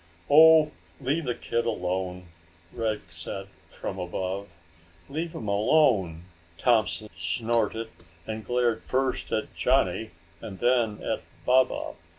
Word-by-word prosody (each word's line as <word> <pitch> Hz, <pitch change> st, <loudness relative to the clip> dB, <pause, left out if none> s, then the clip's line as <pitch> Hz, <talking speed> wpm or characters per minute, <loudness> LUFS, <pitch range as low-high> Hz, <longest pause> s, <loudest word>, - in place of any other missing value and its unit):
"Oh, 160 Hz, 0 st, +8 dB, 0.3 s
leave 145 Hz, +5 st, -1 dB
the 120 Hz, -2 st, -1 dB
kid 115 Hz, 0 st, -2 dB
alone," 90 Hz, -3 st, -3 dB, 0.4 s
Rick 110 Hz, -2 st, -1 dB
said 95 Hz, +3 st, -6 dB, 0.2 s
from 95 Hz, -, -6 dB
above. 95 Hz, +2 st, -3 dB, 0.6 s
"Leave 160 Hz, +4 st, -4 dB
him 110 Hz, -, -5 dB
alone!" 100 Hz, -, +3 dB, 0.3 s
Thompson 110 Hz, 0 st, +2 dB
snorted, 110 Hz, +6 st, 0 dB, 0.4 s
and 110 Hz, 0 st, -5 dB
glared 120 Hz, -2 st, +1 dB
first 130 Hz, 0 st, -1 dB
at 110 Hz, -, -2 dB
Johnny 110 Hz, 0 st, +1 dB, 0.3 s
and 95 Hz, -, -7 dB
then 120 Hz, -4 st, +1 dB
at -, -, -2 dB, 0.2 s
Baba. 130 Hz, +1 st, +2 dB
110 Hz, 115 wpm, -27 LUFS, 95-125 Hz, 0.6 s, Oh